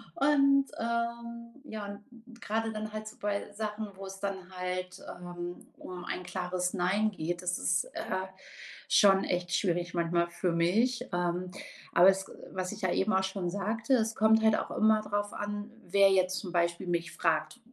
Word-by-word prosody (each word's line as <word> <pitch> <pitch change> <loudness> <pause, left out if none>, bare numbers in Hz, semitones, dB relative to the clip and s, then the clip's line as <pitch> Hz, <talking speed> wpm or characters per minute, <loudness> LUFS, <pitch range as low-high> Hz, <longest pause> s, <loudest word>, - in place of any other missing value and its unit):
und, 275 -1 +4
ähm 235 0 -3 0.2
ja, 215 -1 -4 0.3
und 235 0 -16
gerade 225 +1 -1
dann 215 0 -4
halt 215 0 -5
so 215 - -10
bei 205 0 -2
Sachen, 215 0 -3
wo 195 +1 -8
es 195 0 -8
dann 195 -1 -1 0.2
halt, 180 0 -3 0.2
ähm, 175 0 -7
um 180 -1 -8
ein 180 - -3
klares 180 0 -2
Nein 195 +4 +2
geht, 175 -1 -3
das 180 0 -1
ist, 90 0 +2
äh, 185 0 -2 0.6
schon 195 -1 +6
echt 180 0 -1
schwierig 175 -2 0
manchmal 170 0 +1
für 175 0 -1
mich, 215 +10 +2
ähm, 175 0 -1 0.4
aber 175 +2 +7
es, 195 0 +4
äh - - -12 0.2
was 185 -1 -2
ich 215 - -7
ja 185 -2 +1
eben 205 +3 +1
auch 190 -1 +3
schon 190 -2 -2
sagte, 215 +7 -1
es 225 -2 +1
kommt 220 +1 +5
halt 220 -1 +5
auch - - -3
immer 215 0 +4
darauf 205 -1 -2
an, 205 +1 -4 0.2
wer 195 +2 +5
jetzt 185 -1 +2
zum 185 -3 -7
Beispiel 170 0 +1
mich 170 -1 -1
fragt 165 +7 0
195 Hz, 180 wpm, -30 LUFS, 180-215 Hz, 0.6 s, aber